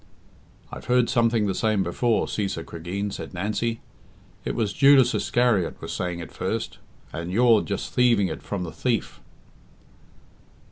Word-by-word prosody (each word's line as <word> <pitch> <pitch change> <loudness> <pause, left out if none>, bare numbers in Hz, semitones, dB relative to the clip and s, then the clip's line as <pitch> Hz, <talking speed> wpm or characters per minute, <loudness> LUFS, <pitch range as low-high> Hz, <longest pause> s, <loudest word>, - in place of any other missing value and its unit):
"I've - - -8
heard 125 -1 +2
something 115 -3 +2
the 100 - 0
same 105 0 +1
before, 110 +6 +1
Cæsar 95 -5 -3
Cregeen," 95 +5 -4
said - - -7
Nancy. 110 +5 -2 0.6
"It - - -3
was 105 -3 -1
Judas 135 -3 +6
Iscariot 120 -7 +1
was - - -6
saying 90 -1 -3
it 85 -2 -8
first, - - -3 0.3
and 85 +2 -5
you're 115 +1 +5
just 100 - -4
thieving 120 -6 +3
it 80 - -6
from 95 -3 -4
a 80 - -6
thief." 120 +3 -2
105 Hz, 145 wpm, -25 LUFS, 90-120 Hz, 0.6 s, Judas